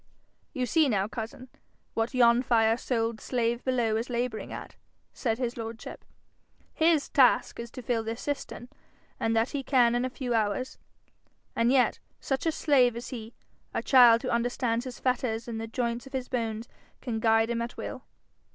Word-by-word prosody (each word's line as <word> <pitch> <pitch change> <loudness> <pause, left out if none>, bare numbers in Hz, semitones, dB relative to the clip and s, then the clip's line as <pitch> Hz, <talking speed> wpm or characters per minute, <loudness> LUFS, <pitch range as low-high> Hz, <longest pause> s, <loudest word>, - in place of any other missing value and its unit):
'You 255 -4 -2
see 315 +2 +3
now, 200 -3 +1
cousin, 225 +3 -7 0.5
what 225 +3 -1
yon 240 -1 +5
fire 225 -3 +3
souled 230 -2 -2
slave 235 -1 -1
below 240 -4 +1
is 230 +3 -3
labouring 240 -2 -3
at,' - - -8 0.4
said 225 -4 -1
his 245 -1 -3
lordship. 225 0 -7 0.7
'His 320 -2 +3
task 250 -3 +3
is 235 0 -6
to 255 - -9
fill 230 -2 0
this 225 +2 -4
cistern, 280 -3 -5 0.5
and 225 0 0
that 225 +2 +1
he 285 - -2
can 250 -3 +3
in 245 +1 +1
a 255 - -1
few 250 -1 -3
hours; 220 +3 -1 0.8
and 230 +1 +3
yet, 260 -2 +3 0.2
such 270 +3 -2
a - - +3
slave 260 -6 +3
is 235 - -6
he, 230 -3 -8 0.4
a - - -1
child 240 -3 +7
who 255 - -2
understands 240 0 0
his 255 -2 -7
fetters 245 -3 -1
and 225 -1 -4
the 225 - -5
joints 235 +2 -3
of 270 - -14
his 260 -1 -3
bones 225 -2 -3 0.3
can 230 -3 -3
guide 225 0 +3
him 235 0 -1
at 235 +1 -5
will.' - - -6
240 Hz, 180 wpm, -28 LUFS, 225-255 Hz, 0.8 s, child